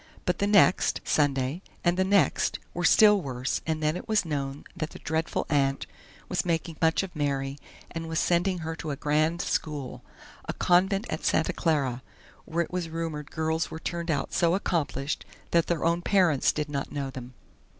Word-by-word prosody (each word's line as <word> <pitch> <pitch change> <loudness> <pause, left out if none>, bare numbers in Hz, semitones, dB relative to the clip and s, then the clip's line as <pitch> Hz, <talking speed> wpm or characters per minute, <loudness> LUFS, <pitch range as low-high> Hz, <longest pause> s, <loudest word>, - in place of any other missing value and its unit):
But 180 - 0
the 200 - +1
next, 200 -2 +4
Sunday, 140 +2 +1 0.2
and 175 0 +3
the 190 - +2
next, 190 -6 +2 0.2
were 175 - -3
still 210 +2 +6
worse, 130 -3 -2
and 155 -1 -1
then 155 +1 +2
it - - -6
was 215 -4 +2
known 140 -2 -3
that 155 -3 -3
the - - -11
dreadful 160 +1 -2
aunt 135 -2 +1 0.4
was - - 0
making 165 -1 -2
much 160 +3 +3
of 185 -3 -8
Mary, 140 -1 -1 0.3
and 165 -1 -5
was 160 - -2
sending 180 +3 +2
her 160 0 -3
to 160 - -5
a 145 - -1
grand 155 +4 +1
school 145 -4 -3 0.4
a - - -3
convent 190 +4 +2
at 155 - -3
Santa 160 - +2
Clara 140 -7 0 0.4
where 170 +1 0
it 170 - -12
was 180 -2 -2
rumored 160 -3 -4
girls 160 +1 -1
were - - -6
turned 170 +1 -4
out 145 -3 -1
so 170 0 +3
accomplished 155 -6 -1 0.3
that 170 -1 +3
their 170 -2 0
own 170 +1 +2
parents 175 -8 +3
did 150 -1 -3
not 140 -2 -4
know 140 -2 -3
them. 130 -2 -9
160 Hz, 185 wpm, -27 LUFS, 145-175 Hz, 0.4 s, still